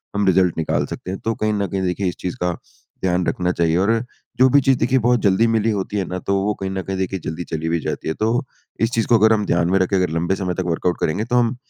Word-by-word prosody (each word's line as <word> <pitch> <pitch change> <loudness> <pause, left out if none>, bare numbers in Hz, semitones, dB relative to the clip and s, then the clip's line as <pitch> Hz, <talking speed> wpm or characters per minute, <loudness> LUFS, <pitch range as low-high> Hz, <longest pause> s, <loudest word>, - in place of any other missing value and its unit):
हम 100 0 +1
रिज़ल्ट 90 -2 +3
निकाल 80 - 0
सकते 90 - -6
हैं। 95 - -5
तो 115 - -1
कहीं 110 0 0
न 100 -1 -1
कहीं 95 +2 -3
देखिए 95 +1 -1
इस 90 - -2
चीज़ 90 - -4
का 90 0 +1 0.5
ध्यान 90 -1 +1
रखना 90 0 0
चाहिए। 85 -2 +1
और 100 +4 +2 0.5
जो 130 - +6
भी 140 - +5
चीज़ 135 0 +3
देखिए 130 +2 +2
बहुत 120 +1 +2
जल्दी 100 +3 +3
मिली 115 -1 +1
होती 100 0 -2
है 95 - 0
ना, 90 - -4
तो 100 - -1
वो 105 +1 +1
कहीं 95 - -3
न 95 0 -3
कहीं 95 +1 -4
देखिए 95 0 -2
जल्दी 80 +2 -4
चली 80 -1 -3
भी 85 0 +1
जाती - - -4
है। 80 - 0
तो 115 +8 0 0.4
इस 115 +1 +2
चीज़ 115 -3 0
को 120 - +5
अगर 110 +1 +5
हम 105 -1 0
ध्यान 85 -2 +1
में 95 - +4
रख 95 - +1
के 100 - +1
अगर 90 -1 +2
लंबे 85 +4 0
समय 90 -2 -2
तक - - 0
वर्कआउट 85 +1 -1
करेंगे 80 +7 0
तो 125 - -1
हम, 120 0 +2
95 Hz, 285 wpm, -21 LUFS, 90-110 Hz, 0.5 s, जो